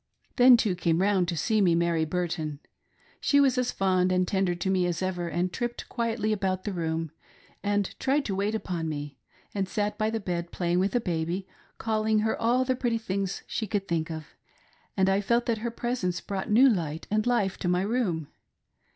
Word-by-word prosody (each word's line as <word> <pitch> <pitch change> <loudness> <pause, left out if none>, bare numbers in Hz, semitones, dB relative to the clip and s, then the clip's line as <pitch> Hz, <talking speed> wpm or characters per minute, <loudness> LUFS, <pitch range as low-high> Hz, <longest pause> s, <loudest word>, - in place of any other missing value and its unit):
Then, 250 -1 +8
too, 210 -4 +1
came 165 -1 +1
round 190 -2 +2
to 170 -1 -2
see 215 +7 +2
me, 175 -4 +4
Mary 170 -1 +1
Burton. 160 -3 -2 0.6
She 285 - +3
was 270 -3 +4
as 250 -1 0
fond 185 -1 +2
and 185 0 +2
tender 190 -2 +1
to 175 +2 -2
me 185 -2 +2
as 175 +1 -2
ever, 180 -2 -2
and 175 +2 -1
tripped 240 -1 -4
quietly 225 -3 -1
about 190 -2 -1
the 205 - -3
room, 165 -2 -2 0.5
and 205 -1 0
tried 275 +2 +1
to 200 - -2
wait 200 +3 0
upon 175 -6 -3
me, 145 -2 -6 0.3
and 195 -2 -2
sat 210 -1 -2
by 215 0 +2
the 225 0 -2
bed, 175 -3 -3
play 175 -2 -2
ing 175 - +3
with 200 +5 +1
baby, 175 +2 -2 0.3
calling 220 -1 +1
her 220 +1 +1
all 245 +3 +3
the 255 0 +1
pretty 240 -2 0
things 195 -3 -3
she 220 - -3
could 195 0 -2
think 165 -1 -1
of, 160 -2 -6 0.7
and 190 0 +3
I 195 +1 +3
felt 235 +4 +1
that 230 -2 0
her 235 +2 -2
presence 235 -7 -2
brought 195 +1 -4
new 240 +6 +6
light 165 - -1
and 215 +2 +1
life 205 -6 +1
to - - -2
my 180 +1 +2
room. 200 - -1
195 Hz, 205 wpm, -27 LUFS, 175-220 Hz, 0.7 s, Then